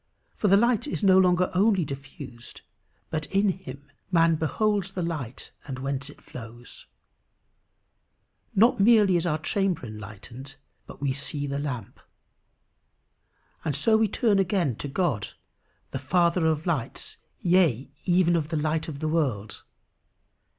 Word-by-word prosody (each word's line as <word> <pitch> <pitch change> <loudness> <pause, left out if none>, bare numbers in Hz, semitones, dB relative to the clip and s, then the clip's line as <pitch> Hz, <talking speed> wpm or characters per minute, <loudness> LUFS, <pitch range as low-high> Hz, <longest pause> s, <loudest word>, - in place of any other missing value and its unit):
For 210 - 0
the 195 0 +6
light 235 +4 +2
is 285 - -3
no 190 -1 +6
longer 180 -1 +3
only 195 -2 +3
diffused, 135 -3 -9 0.5
but 155 -2 -2
in 195 +1 +2
him 145 -7 -6 0.3
man 165 -2 +4
"beholds 195 +5 0
the 180 - -2
light 145 -8 -5 0.2
and 135 -2 -5
whence 135 +1 -3
it 145 - -15
flows." 120 0 -11 1.7
Not 225 +4 +5
merely 205 -3 +5
is 175 0 +1
our 155 -2 +1
chamber 185 -1 -1
enlightened, 110 +5 -9 0.3
but - - -12
we 140 -2 0
see 145 +1 -3
the 140 0 -3
lamp. 125 -8 -5 1.6
And 150 -4 -1
so 220 +10 +3
we 220 0 +4
turn 210 -1 +2
again 185 - +1
to - - -5
God, 140 - -1 0.6
the - - -3
Father 170 -1 +2
of 155 0 0
lights, 155 -10 -2 0.2
yea 165 -8 +2
even 175 -1 +3
of 155 -2 -1
The 160 - -1
Light 155 +1 -1
of 145 -2 -7
the 155 - 0
World. 135 -11 -1
160 Hz, 145 wpm, -26 LUFS, 135-190 Hz, 1.7 s, the